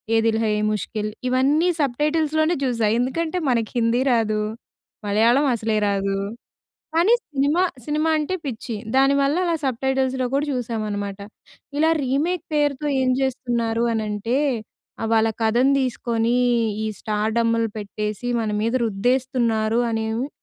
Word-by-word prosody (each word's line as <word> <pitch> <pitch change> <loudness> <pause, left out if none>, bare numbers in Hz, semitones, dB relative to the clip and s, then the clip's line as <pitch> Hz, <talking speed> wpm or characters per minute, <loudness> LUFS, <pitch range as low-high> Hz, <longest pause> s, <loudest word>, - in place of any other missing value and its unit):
'ఏ - - +5
Dil 225 0 +2
high 215 - +1
ఎ - - -1
ముష్కిల్' 215 0 -3 0.2
ఇవన్నీ 280 +7 +3
subtitles 300 +4 0
లోనే 320 +2 +2
చూసా. 230 -4 +1
ఎందుకంటే, 315 +7 -1
మనకు 230 -3 0
హిందీ 235 +1 +2
రాదు, 215 -2 +1 0.7
మలయాళం 230 +8 +3
అసలే 220 -1 -1
రాదు. 195 0 0 0.8
కానీ 355 +8 +4 0.2
సినిమా, 285 +6 +2 0.2
సినిమా 305 +2 0
అంటే 305 +5 -2
పిచ్చి. 235 -2 -4 0.2
దానివల్ల 275 +1 +3
అలా 335 -1 +1
సబ్‌టైటిల్స్‌లో 260 0 0
కూడా 285 +2 +1
చూశామన్నమాట. 210 -4 -3 0.6
ఇలా 320 +1 +4
రీమేక్ 310 +6 0
పేరుతో 290 0 +1
ఏం 255 - +2
జేస్తున్నారు 235 -3 -1
అనంటే, 220 +3 -1 0.7
ఆహ్, 225 - -1
వాళ్ళ 225 0 +4 0.2
కథను 240 +5 +3
తీసుకొని 235 -2 0 0.5
ఈ - - -1
స్టార్‌డమ్‌లు 225 +2 0
పెట్టేసి, 210 +3 -4
మన 220 - -2
మీద 230 +2 0
రుద్దేస్తున్నారు 230 0 +1
అనెమొ 225 +3 -1
240 Hz, 125 wpm, -22 LUFS, 220-275 Hz, 0.8 s, ఏ